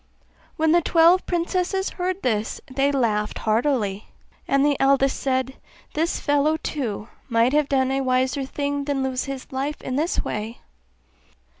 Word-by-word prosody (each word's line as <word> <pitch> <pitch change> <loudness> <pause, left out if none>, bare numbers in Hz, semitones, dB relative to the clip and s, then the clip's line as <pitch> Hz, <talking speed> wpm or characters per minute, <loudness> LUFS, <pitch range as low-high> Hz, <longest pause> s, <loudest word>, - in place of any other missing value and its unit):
When 315 0 +2
the 345 +1 +5
twelve 340 +3 +4
princesses 365 +2 -1
heard 365 +1 -3
this 220 -3 -1
they 275 +2 0
laughed 215 -6 0
heartily; 220 -3 0 0.4
and 275 +1 +3
the 290 -1 +3
eldest 270 0 +3
said, 260 0 -1 0.4
'This 325 +3 0
fellow 290 +2 +2
too 230 -10 -4 0.2
might 230 +2 +3
have 300 -1 +2
done 265 -1 +2
a 270 0 0
wiser 260 +1 +1
thing 285 +1 -3
than 280 -2 -1
lose 260 -1 -1
his 275 -2 -7
life 275 +3 -3
in 255 - -2
this 320 +4 0
way! 215 +2 -4
275 Hz, 150 wpm, -23 LUFS, 255-300 Hz, 0.4 s, the